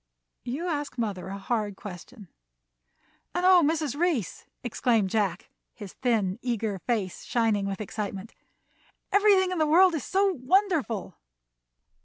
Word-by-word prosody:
"You 285 +9 -3
ask 290 -5 -3
mother 200 -6 -3
a 195 +1 -5
hard 210 0 -2
question." 205 +3 -10 1.1
"And 355 +1 0
oh, 370 -1 +7
Mrs. 305 -3 0
Reece," 305 - -1 0.2
exclaimed 230 -4 +1
Jack, 205 -3 -1 0.2
his 205 -5 -9
thin, 220 -5 0
eager 225 -5 -2
face 205 -4 -2
shining 220 -4 +1
with 195 -1 -4
excitement, 210 -1 -5 0.8
"everything 395 -2 +4
in 365 - -2
the 310 - +3
world 355 +4 +6
is 310 - -2
so 390 +1 +2
wonderful!" 310 - 0
240 Hz, 130 wpm, -27 LUFS, 205-325 Hz, 1.1 s, oh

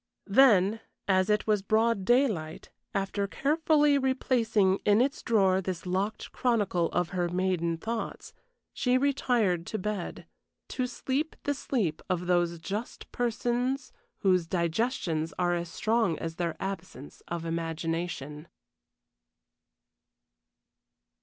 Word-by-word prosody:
Then, 210 -2 +5 0.3
as 185 0 +3
it 210 0 +2
was 210 -2 +2
broad 220 0 +1
daylight, 215 - +1 0.2
after 200 0 -1
carefully 295 - +3
replacing 235 -7 +2
in 205 +1 +3
its 270 +3 +1
drawer 190 -5 +3
this 185 -2 -4
locked 190 +4 -2
chronicle 205 -9 +1
of 175 -1 0
her 175 -2 -1
maiden 175 -2 0
thoughts, 225 +6 -5 0.4
she 250 0 +2
retired 240 -10 +1
to 220 - -3
bed, 210 -2 -4 0.4
to 255 -1 -1
sleep 265 +5 -2
the 285 - 0
sleep 230 - -2
of 180 -1 -1
those 175 -1 +1
just 200 +8 -6
persons 245 +3 -1 0.3
whose 185 -3 +3
digestions 170 - -1
are 175 -1 +1
as 170 -1 -2
strong 220 -1 +1
as 165 0 -5
their 170 -2 -2
absence 185 -8 -6
of 170 -1 -4
imagination. 165 -2 -3
195 Hz, 115 wpm, -29 LUFS, 175-240 Hz, 0.4 s, Then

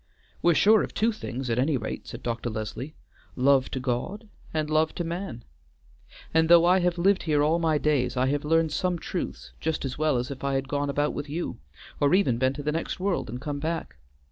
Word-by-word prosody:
"We're 170 -1 +4
sure 215 +6 +6
of - - -5
two 225 +2 +2
things 135 - -5
at 115 - +1
any 140 +2 +2
rate," 110 - -5
said - - -8
Dr. 120 0 -2
Leslie, 110 +7 -5 0.4
"love 130 0 +3
to 130 - -3
God 130 - -3 0.2
and 155 -1 -1
love 155 +1 +1
to 175 - -2
man. 170 -8 -5 0.9
And 160 0 +3
though 170 0 +8
I 180 +2 +5
have 175 -1 +1
lived 190 +3 +3
here 150 -3 +2
all 160 +3 +2
my 160 -2 +2
days, 140 -4 +1
I 125 - +3
have 145 +1 0
learned 160 +1 +2
some 180 +3 0
truths 175 +2 -5
just 160 -2 -2
as 135 +2 -4
well 155 -4 +2
as 125 +3 -3
if 135 - -8
I 140 0 0
had 135 0 -1
gone 145 +1 -1
about 145 +1 0
with 145 0 -5
you, 165 +4 -4 0.4
or 145 +4 +4
even 130 -12 +2
been 130 +1 +2
to 145 +1 -6
the 150 - 0
next 165 +3 -3
world 190 - -1
and 125 +3 -5
come 145 +1 -4
back. 160 - -3
150 Hz, 220 wpm, -26 LUFS, 130-170 Hz, 0.9 s, though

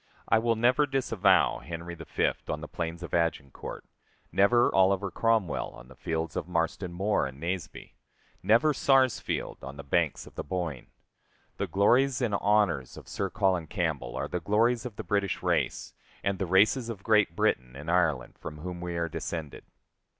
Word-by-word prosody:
I 110 - +4
will 115 0 +1
never 125 +6 +3
disavow 130 -7 +2
Henry 85 +1 -7
V 80 -1 -9 0.4
on 75 - -3
the 75 - -6
plains 85 +3 -5
of 85 - -8
Agincourt; 80 -5 -2 0.5
never 120 +5 +4
Oliver 95 0 +3
Cromwell 115 -8 +1
on - - -13
the - - -14
fields 80 -1 -3
of - - -3
Marston 85 +1 -1
Moor 95 -4 0
and 65 +1 -11
Naseby; 85 -2 -5 0.5
never 120 +8 +4
Sarsfield 130 -1 +1
on 70 +1 -8
the 70 - -7
banks 75 +1 0
of - - -14
the - - -5
Boyne. 80 -5 -4 0.7
The - - -2
glories 125 +6 +3
and 120 -5 0
honors 100 -10 +1
of - - -11
Sir - - -2
Colin 90 -4 +1
Campbell 80 - -2
are - - -2
the 90 - -3
glories 115 +7 +2
of 115 - -11
the - - -6
British 100 -2 -1
race, - - 0 0.3
and 100 -1 -1
the 95 - -1
races 110 +7 +3
of 100 -4 -6
Great 105 -6 +3
Britain 65 -4 0
and 75 +5 -4
Ireland, 80 -8 +1
from 75 - -7
whom 90 +2 -6
we 90 -1 -4
are 85 0 0
descended. 80 -2 -5
90 Hz, 170 wpm, -28 LUFS, 80-110 Hz, 0.7 s, I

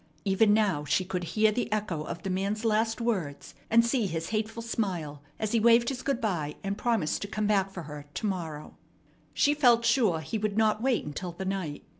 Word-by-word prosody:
Even 205 +2 +4
now 205 -8 +2
she 150 +6 +1
could 180 -1 -3
hear 215 0 +4
the 235 +1 -2
echo 205 -7 -1
of 160 - -6
the 195 - -2
man's 200 +4 -2
last 225 +1 +1
words, 190 -12 -2 0.2
and 230 +1 +5
see 235 -3 +1
his 165 -2 -4
hateful 220 +1 -2
smile 175 -11 -3 0.2
as 215 -1 -2
he 230 - +3
waved 235 +1 +5
his 260 -2 -4
good 275 -3 -1
by 165 - -2
and 195 0 -2
promised 225 -7 0
to 200 - -3
come 215 +1 -2
back 195 -2 +2
for 185 -3 -7
her 150 -1 -9
to - - -3
morrow. 165 -7 -4 0.6
She 290 - +4
felt 240 -5 +4
sure 230 -9 +3
he 220 +7 -3
would 210 0 -2
not 215 -1 +2
wait 255 -1 +1
until 170 +4 -5
the 190 +3 -6
night. 185 -6 -3
210 Hz, 210 wpm, -28 LUFS, 175-230 Hz, 0.6 s, and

